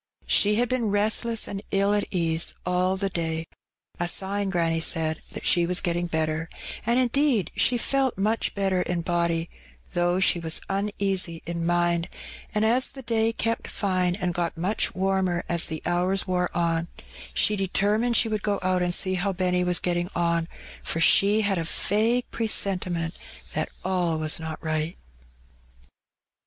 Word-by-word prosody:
She 210 0 +4
had 240 +3 +2
been 240 -3 0
restless 215 +3 +1
and 195 -1 -5
ill 200 +1 +2
at 205 -1 +1
ease 165 -2 0
all 180 +1 +1
the 195 +1 0
day 165 -3 -2 0.3
— - - -36
a 175 - 0
sign, 195 +2 -1
granny 165 -3 +1
said, 160 -1 0
that - - -5
she 175 -2 +4
was 180 +1 +2
getting 175 -1 -1
better; 160 0 -1 0.4
and, 240 +2 +3
indeed, 255 - +2
she 245 - +3
felt 265 0 +1
much 215 +4 0
better 195 -2 +1
in 175 -1 -1
body, 170 -1 0 0.5
though 175 +1 +1
she 190 -2 +3
was 160 -1 -1
uneasy 195 -3 -1
in 170 0 -3
mind^ 175 0 +1 0.4
and, 215 0 +1
as 245 +4 +3
the 270 - -11
day 225 -1 +1
kept 230 0 -2
fine 185 -3 0
and 180 -3 -2
got 170 -1 -2
much 185 +6 0
warmer 190 -2 0
as 170 -1 0
the 160 -1 -5
hours 180 +2 +1
wore 180 -1 0
on, 165 -1 0 0.4
she 210 - +2
determined 210 +4 +1
she 230 - +4
would 215 -2 -2
go 205 -1 0
out 185 0 +1
and 175 0 0
see 185 -1 0
how 185 +2 0
Benny 180 -1 +1
was 180 -1 +2
getting 175 0 -1
on, 170 -1 +1 0.4
for 165 - -1
she 200 +5 +5
had 200 -4 +1
a - - -1
vague 220 +8 0
pre 230 - -1
sentiment 180 -5 +1 0.3
that - - -1 0.2
all 180 -3 0
was 155 0 +1
not 160 -1 -5
right. 155 +1 -2
180 Hz, 170 wpm, -25 LUFS, 170-205 Hz, 0.5 s, she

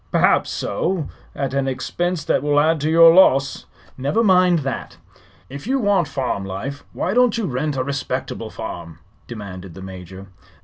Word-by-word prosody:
"Perhaps - - +3
so; 165 - -2 0.3
at 135 -1 -3
an 140 -1 0
expense 175 +5 -2
that - - +1
will 145 0 +2
add 155 0 +2
to 150 - 0
your 165 0 +7
loss." 135 -7 +4 0.3
"Never 145 - +1
mind 180 -5 +4
that." 135 - -5 0.5
"If 140 +9 -9
you 270 +2 +1
want 200 - +2
farm 130 -8 -2
life, 120 +10 -6
why 185 - -2
don't 245 -2 +3
you 225 - -1
rent 140 +1 -2
a 130 - 0
respectable 140 +1 -4
farm?" 85 -2 -7 0.3
demanded 95 -6 -8
the 95 - -9
Major. 95 0 -9
140 Hz, 165 wpm, -21 LUFS, 125-175 Hz, 0.5 s, your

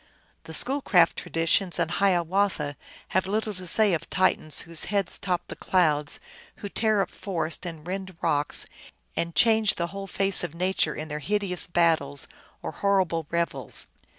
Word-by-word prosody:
The 160 - -4
Schoolcraft 240 - +3
traditions 165 +3 0
and 170 -1 0
Hiawatha 180 -5 +1 0.3
have 185 +1 0
little 215 +1 -1
to 185 -1 -8
say 210 +2 +3
of 165 0 -3
Titans 185 -5 +1
whose 165 -1 -5
heads 200 -3 -1
top 180 -3 -1
the - - -7
clouds, 150 -5 +1 0.4
who 205 - -7
tear 215 -1 +1
up - - -9
forests 170 -2 -3
and 160 -3 -8
rend 190 0 -5
rocks, 145 -3 +4 0.5
and 170 -1 -2
change 220 +3 +4
the 170 - -1
whole 195 0 -6
face 195 0 +3
of 170 -2 -5
Nature 180 -3 0
in 155 - -6
their 150 0 -5
hideous 185 +3 -1
battles 160 -5 +1 0.4
or - - -4
horrible 185 -6 0
revels. 170 -8 0
175 Hz, 155 wpm, -26 LUFS, 160-195 Hz, 0.5 s, rocks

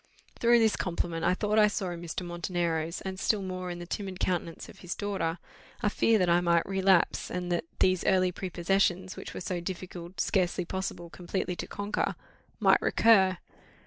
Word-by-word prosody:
Through 235 0 +5
this 220 -3 +3
compliment, 170 -2 -2
I 185 - +3
thought 210 +2 +1
I 210 - +7
saw 195 -3 -2
in 170 -1 -6
Mr. 175 +1 -5
Montenero's, 170 -1 -2
and 190 0 -5
still 205 -1 +1
more 185 -1 -4
in 175 - -5
the 175 - -7
timid 190 0 -5
countenance 175 -2 -2
of - - -14
his 180 -1 -5
daughter, 195 -5 -2 0.5
a 210 - +2
fear 225 +1 +3
that 185 -3 +2
I 175 +1 +4
might 170 -1 +3
relapse; 190 -2 +2
and 180 0 -3
that 175 -1 0
these 185 -1 +3
early 185 -1 +3
prepossessions, 185 +1 0
which - - -8
were - - -5
so 180 0 -2
difficult, 180 0 -7
scarcely 180 -2 +1
possible, 175 -2 -5
completely 180 0 -3
to - - -5
conquer, 205 +1 -2 0.4
might - - +5
recur. 190 -5 +4
185 Hz, 180 wpm, -29 LUFS, 175-195 Hz, 0.5 s, I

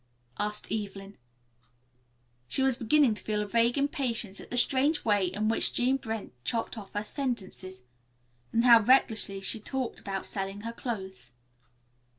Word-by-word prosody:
asked 210 0 -3
Evelyn. 200 -2 -4 1.3
She 265 - +1
was 265 -2 +3
beginning 250 +1 +4
to 210 - -8
feel 210 -1 -1
a - - -6
vague 230 +4 +2
impatience 255 - -1
at - - -12
the 245 - -2
strange 275 +5 +2
way 205 -4 +3
in 210 +4 -1
which 225 - 0
Jean 255 +2 +3
Brent 225 -4 -5
chopped 230 - -2
off 205 -4 -9
her 205 - -1
sentences. 200 - -4 0.7
And 230 - +2
how 235 -2 +9
recklessly 220 -4 +3
she 195 +3 0
talked 260 +3 -3
about 195 -1 -4
selling 195 +1 -4
her 230 +2 -5
clothes. 190 - -6
220 Hz, 155 wpm, -29 LUFS, 200-245 Hz, 1.3 s, how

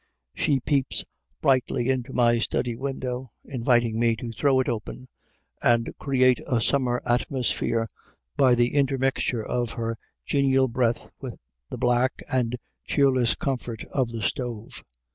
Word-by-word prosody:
She 140 -3 +1
peeps 140 0 0 0.4
brightly 130 -1 +2
into 130 0 -2
my 120 -2 +3
study 120 +1 -1
window, 130 -1 -4
inviting 120 -3 +1
me 115 -1 +3
to 115 +1 -6
throw 135 +3 +2
it 130 - +1
open 120 +3 -4 0.5
and 115 0 +2
create 130 -3 +3
a 120 - +2
summer 125 0 +1
atmosphere 120 -2 0 0.5
by 130 -3 +5
the 120 0 +2
intermixture 135 -4 +1
of 120 -2 -1
her 115 -1 -3 0.3
genial 135 -2 +3
breath 120 -1 0
with - - -6 0.3
the - - -5
black 125 +2 +1
and 125 -1 +1 0.3
cheerless 130 -4 +3
comfort 125 -5 -3
of 130 -3 +1
the 115 -2 -5
stove. 120 -3 -4
125 Hz, 135 wpm, -25 LUFS, 115-130 Hz, 0.5 s, by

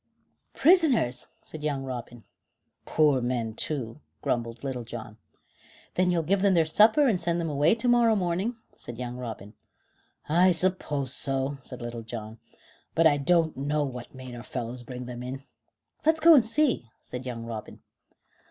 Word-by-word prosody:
"Prisoners!" 290 - +3 0.2
said 155 - -8
young 145 -3 -1
Robin. 120 -3 -7 0.6
"Poor 150 -4 +3
men, 120 -2 -1
too," 115 -2 -4 0.2
grumbled 115 0 -2
Little 130 -3 -3
John. 110 -2 -8 0.8
"Then 180 0 +2
you'll 170 -2 +1
give 190 +4 +1
them 195 -2 +4
their 165 -2 +4
supper 220 - +5
and 195 -7 +1
send 170 0 0
them 165 -2 -2
away 145 +7 +3
to 230 +2 -2
morrow 240 -2 +5
morning," 190 +5 -1 0.2
said 120 - -9
young 125 0 -5
Robin. 110 -4 -7 0.7
"I 175 +4 +5
suppose 155 -7 -1
so," 135 +1 -1
said 125 -2 -5
Little 120 -1 -5
John, 110 -1 -8 0.6
"but 165 - +4
I 145 -2 +6
don't 165 +2 +2
know 145 +2 0
what 125 -3 -7
made 130 -1 -9
our 120 - -7
fellows 120 +2 -5
bring 125 0 -7
them 120 0 -7
in." 130 +2 -6 0.6
"Let's 320 +1 +3
go 330 +1 +8
and 275 -6 +7
see," 230 - +1
said 125 +1 -7
young 115 -2 -5
Robin. 115 -2 -7
140 Hz, 160 wpm, -27 LUFS, 120-180 Hz, 0.8 s, go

